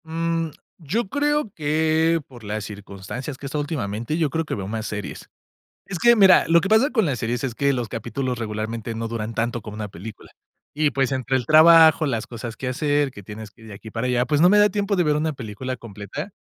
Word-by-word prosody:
Mm, 165 0 -1 0.3
yo 195 +9 -2
creo 295 -3 0
que, 160 +1 +1
por 120 -3 -14
las 105 0 -4
circunstancias 105 +7 -7
que 140 - -10
he - - -3
estado 150 +2 -2
últimamente, 120 -3 -3
yo 160 -3 +1
creo 160 +2 -1
que - - -3
veo 95 -2 -5
más 110 +1 -4
series. 105 -1 -6 0.6
Es 195 - -5
que, 235 +8 +5
mira, 195 -4 +6
lo 170 +1 +5
que 195 - -2
pasa 220 +6 +4
con 225 -6 +2
las 135 -6 -1
series 120 +2 -2
es 125 -3 -3
que 140 +2 +2
los 120 -3 -2
capítulos 125 +2 -3
regularmente 110 +1 -4
no 115 0 -3
duran 115 -1 -4
tanto 120 +1 -2
como 105 0 -9
una 105 -1 -4
película. 100 +3 -10 0.4
Y, 150 0 +1
pues, 135 -2 0
entre 130 0 0
el 125 - -4
trabajo, 160 +1 +7
las 115 -6 -2
cosas 115 -1 -7
que 130 - -5
hacer, 145 +2 0
que 100 - -12
tienes 105 +2 -9
que 115 - -24
ir 110 - -13
de 105 - -9
aquí 110 +2 -11
para 115 +3 -2
allá, 125 0 +1
pues, 145 +3 +1
no 175 - +7
me 205 +2 +5
da 205 0 +6
tiempo 205 +1 -1
de 180 - +2
ver 150 -2 +2
una 155 +1 0
película 130 +1 -6
completa. 115 - -7
130 Hz, 235 wpm, -23 LUFS, 115-160 Hz, 0.6 s, trabajo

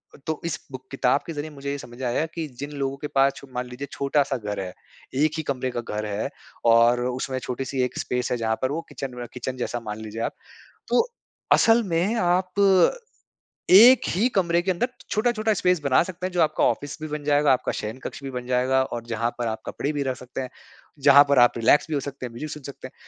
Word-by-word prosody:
अ, - - -14
तो 160 -1 -2
इस 165 -2 -2
बुक 130 0 -8
किताब 135 0 +2
के 165 - -4
ज़रिए 150 +1 -5
मुझे 140 -1 -6
ये 140 - -3
समझ 120 -3 -11
में 130 - -3
आया 120 +6 0
की 165 -2 -4
जिन 145 +1 -5
लोगों 135 0 -2
के 150 - -5
पास 135 0 +4
छो 140 - -12
मान 125 0 -2
लीजिए 125 +3 -7
छोटा-सा 140 -1 0
घर 105 -3 -4
है, 90 -2 -5 0.4
1 150 +3 +3
ही 160 - -2
कमरे 130 -3 -2
का 120 -1 -3
घर 105 -2 -4
है, 105 0 -2 0.4
और 115 +1 +5
उसमें 130 +1 -2
छोटी-सी 130 +1 -3
एक 125 - -3
स्पेस 125 -1 -2
है 125 - +1
जहाँ 110 -1 0
पर 130 - 0
वो 160 +3 -2
किचन 135 -2 -6
में 120 0 -6
किचन 130 +1 -5
जैसा 120 -1 -3
मान 105 -2 -6
लीजिए 110 +1 -6
आप। - - -2 0.6
तो 465 - +3 0.5
असल 230 +1 +5
में 175 +6 +1
आप 185 -2 +1 1.2
1 235 +7 +9
ही 210 +8 +2
कमरे 170 -3 +2
के 190 - -1
अंदर 185 +7 0 0.2
छोटा-छोटा 220 0 +1
स्पेस 180 -3 +2
बना 135 -2 +4
सकते 180 +1 -5
हैं 185 - -5
जो 175 - 0
आपका 155 -1 +2
ऑफिस 145 -1 -1
भी 155 - -4
बन 150 -1 -5
जाएगा, 145 -1 +4
आपका 130 - 0
शयनकक्ष 115 +6 -6
भी 135 - -4
बन 125 -1 -5
जाएगा, 130 +1 +2
और 120 -3 -5
जहाँ 115 0 -1
पर 120 - -1
आप 110 -1 -3
कपड़े 145 - -2
भी 145 -1 -2
रख 130 -2 -2
सकते 125 +2 -7
हैं। 130 -1 -5 0.6
जहाँ 140 0 +9
पर 140 - +4
आप 120 0 +6
रिलैक्स 115 +5 +4
भी 155 - -2
हो 145 - +1
सकते 140 -2 -6
हैं, 120 - -9
म्यूज़िक 150 +6 -6
सुन 150 - -7
सकते 140 +1 -9
हैं। - - -25
135 Hz, 235 wpm, -24 LUFS, 125-155 Hz, 1.2 s, 1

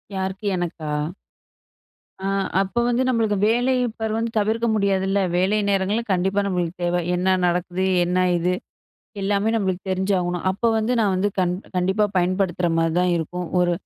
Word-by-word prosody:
யாருக்கு? 190 +2 -3
எனக்கா? 165 -3 -4 1.3
ஆ, 190 - -6 0.4
அப்போ 195 +5 -1
வந்து 245 +2 +2
நம்மளுக்கு 220 -4 +1
வேலை 245 +4 +2 0.3
பார் 220 -1 -1
வந்து 230 0 -2
தவிர்க்க 220 +3 0
முடியாதுல்ல. 195 -1 +1 0.2
வேலை 190 +4 +2
நேரங்கள்ல 200 +4 +1
கண்டிப்பா 190 +2 +1
நம்மளுக்கு 180 -2 -2
தேவ 175 0 +1
என்ன 185 +1 +2
நடக்குது? 180 +1 0 0.2
என்ன 180 +1 0 0.2
இது? 180 +2 0 0.7
எல்லாமே 200 +2 +1
நம்மளுக்கு 190 -3 -1
தெரிஞ்சாகணும். 185 -2 0
அப்போ 200 +5 -1
வந்து 220 +3 0
நான் 205 -3 +2
வந்து 190 +3 +1
கண் 180 -1 +2 0.2
கண்டிப்பா 190 +4 +2
பயன்படுத்துகிற 180 -1 +1
மாதிரி 165 0 +1
தான் 180 -1 +2
இருக்கும். 175 +2 -4
ஒரு 175 0 +3
190 Hz, 145 wpm, -22 LUFS, 180-205 Hz, 1.3 s, ஒரு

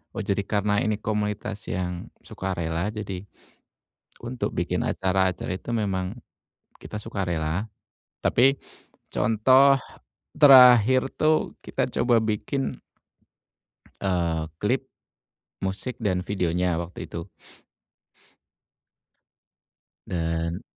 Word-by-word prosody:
Oh, 110 - -3
jadi 100 0 0
karena 105 0 0
ini 110 -1 0
komunitas 105 -1 -3
yang, 90 -1 -3 0.2
sukarela, 85 -1 -3
jadi 100 -4 -5 1.0
untuk 120 0 -4
bikin - - -1
acara-acara 95 -1 0
itu - - -11
memang, 95 -2 -2 0.7
kita 105 - -6
sukarela. 95 -2 -2 0.5
Tapi, 135 +3 +3 0.6
contoh, 130 +6 +5 0.6
terakhir 130 -3 +8 0.2
tuh, 155 0 +1
kita - - -1
coba 120 -2 +3
bikin 110 +5 -2 1.2
eee, 85 -4 0 0.2
klip, 130 +5 0 0.8
musik 95 +7 -3
dan 90 -3 0
videonya, 90 -3 0
waktu 85 +1 -8
itu. 85 0 -7 2.8
Dan, 85 0 -2
100 Hz, 85 wpm, -25 LUFS, 90-115 Hz, 2.8 s, terakhir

